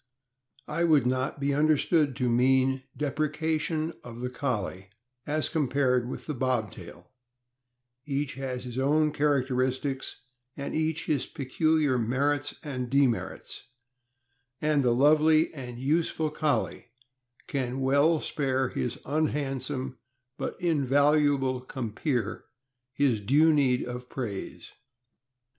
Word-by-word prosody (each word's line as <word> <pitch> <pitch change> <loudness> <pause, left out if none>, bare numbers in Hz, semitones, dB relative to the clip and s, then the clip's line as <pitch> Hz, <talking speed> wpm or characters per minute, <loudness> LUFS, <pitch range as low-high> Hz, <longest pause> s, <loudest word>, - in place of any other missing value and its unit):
I 160 +3 -1
would 155 -6 +4
not 130 +3 -1
be 140 0 0
understood 150 -1 +2
to 125 -1 0
mean 130 +2 +3 0.2
depreciation 155 +2 -1
of 120 -1 -9
the 125 0 -3
Collie 105 -8 -3 0.4
as 155 +1 +1
compared 130 -5 +1
with - - -6
the 155 - -3
Bobtail; 110 -9 -3 1.0
each 140 0 -1
has 130 -2 -4
his 125 0 -5
own 150 +3 +2
char 145 -3 +2
acteristics 130 +1 -2 0.4
and 140 - -4
each 160 +1 0
his 150 -5 0
peculiar 150 -1 +1
merits 140 +5 0
and 130 -5 -4
demerits, 135 -3 0 1.0
and 150 -2 +2
the 125 - +3
lovely 155 +4 +4
and 125 -5 -7
useful 155 +3 0
Collie 155 -5 -1 0.6
can 130 -1 -2
well 140 +5 +3
spare 130 -3 0
his 125 +1 -3
unhandsome 135 -3 -2 0.4
but - - -5
invaluable 145 -4 +2
compeer 120 -2 -3 0.5
his 130 -4 +1
due 150 +9 +4
meed 130 -4 +2
of 125 0 -7
praise. 110 -7 -6
135 Hz, 115 wpm, -28 LUFS, 125-150 Hz, 1.0 s, would